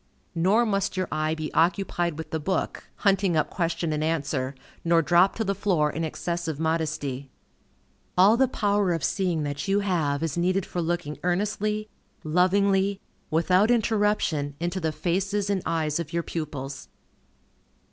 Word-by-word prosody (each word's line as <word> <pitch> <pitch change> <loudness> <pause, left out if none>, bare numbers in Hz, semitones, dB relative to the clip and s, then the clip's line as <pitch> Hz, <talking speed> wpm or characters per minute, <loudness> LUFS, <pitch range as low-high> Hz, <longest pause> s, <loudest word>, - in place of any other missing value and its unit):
Nor 190 +8 +3
must 200 -3 -1
your 185 - 0
eye 155 +1 0
be 155 -1 -5
occupied 175 -1 +1
with 160 -1 -7
the 160 - -1
book, 190 +5 -2
hunting 195 -4 +2
up 155 -1 0
question 170 -2 -1
and 150 0 -1
answer, 140 -4 -1 0.3
nor 165 -1 +3
dropped 175 +4 +4
to 225 - 0
the 200 -2 0
floor 175 -7 +1
in 160 - -3
excessive 165 -1 -3
modesty. 155 -4 -2 0.9
All 195 +5 +7
the 265 +2 +3
power 205 -5 +1
of 165 -4 -3
seeing 180 -5 0
that 145 +2 -4
you 200 +1 +2
have 160 -7 0
is 165 0 -2
needed 185 +2 +1
for 175 - -3
looking 170 -2 -2
earnestly, 210 +4 -1 0.4
lovingly, 195 +4 +2 0.3
without 180 +6 +3
interruption, 210 - +1
into 175 +3 -2
the 160 -3 -1
faces 195 +5 -1
and 195 -2 0
eyes 160 -1 0
of 160 -3 -5
your 170 0 -1
pupils. 140 -5 -5
170 Hz, 155 wpm, -26 LUFS, 155-195 Hz, 0.9 s, All